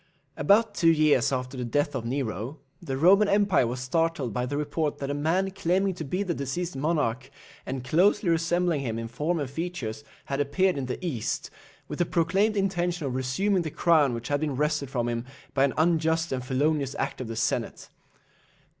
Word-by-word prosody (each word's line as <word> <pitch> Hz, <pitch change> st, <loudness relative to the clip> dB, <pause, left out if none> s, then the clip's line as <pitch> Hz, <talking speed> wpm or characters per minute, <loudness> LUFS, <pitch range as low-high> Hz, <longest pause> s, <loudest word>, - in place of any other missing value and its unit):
About 205 Hz, +9 st, +3 dB
two 165 Hz, -, +3 dB
years 155 Hz, -6 st, +4 dB
after 130 Hz, 0 st, -3 dB
the 125 Hz, -, -3 dB
death 145 Hz, +4 st, 0 dB
of 125 Hz, -4 st, -3 dB
Nero, 120 Hz, -, -3 dB, 0.2 s
the 135 Hz, -1 st, -3 dB
Roman 195 Hz, +7 st, +5 dB
empire 200 Hz, -, +3 dB
was 125 Hz, +2 st, -4 dB
startled 150 Hz, -3 st, 0 dB
by 125 Hz, +3 st, -1 dB
the 145 Hz, +2 st, -2 dB
report 150 Hz, +1 st, -1 dB
that 140 Hz, 0 st, -3 dB
a -, -, -1 dB
man 165 Hz, +7 st, 0 dB
claiming 190 Hz, +1 st, +1 dB
to 170 Hz, -, -6 dB
be 180 Hz, +7 st, -2 dB
the 180 Hz, -3 st, -1 dB
deceased 155 Hz, +5 st, -3 dB
monarch, 135 Hz, -4 st, -1 dB, 0.4 s
and 130 Hz, -1 st, -4 dB
closely 175 Hz, +9 st, +3 dB
resembling 170 Hz, -1 st, +1 dB
him 115 Hz, -4 st, -3 dB
in 115 Hz, 0 st, -4 dB
form 150 Hz, +9 st, -1 dB
and 145 Hz, -, -2 dB
features, 145 Hz, -5 st, -5 dB, 0.2 s
had 135 Hz, 0 st, -3 dB
appeared 180 Hz, +7 st, +2 dB
in 135 Hz, -3 st, -3 dB
the 125 Hz, -, -3 dB
East, 125 Hz, -11 st, -3 dB, 0.4 s
with -, -, -6 dB
the 175 Hz, -, +3 dB
proclaimed 195 Hz, +6 st, +1 dB
intention 175 Hz, -4 st, 0 dB
of 130 Hz, -, -2 dB
resuming 175 Hz, +10 st, 0 dB
the 160 Hz, -, -3 dB
crown 150 Hz, -5 st, +3 dB
which 115 Hz, +1 st, -6 dB
had 145 Hz, 0 st, +1 dB
been 150 Hz, -3 st, -2 dB
wrested 150 Hz, -1 st, 0 dB
from 120 Hz, -3 st, -1 dB
him 120 Hz, -1 st, -2 dB, 0.3 s
by 135 Hz, 0 st, +4 dB
an 140 Hz, -, -1 dB
unjust 160 Hz, 0 st, +2 dB
and 130 Hz, -1 st, -2 dB
felonious 140 Hz, +1 st, 0 dB
act -, -, -3 dB
of 125 Hz, -, -5 dB
the 115 Hz, -, -5 dB
Senate. 115 Hz, 0 st, -2 dB
150 Hz, 195 wpm, -27 LUFS, 130-175 Hz, 0.4 s, Roman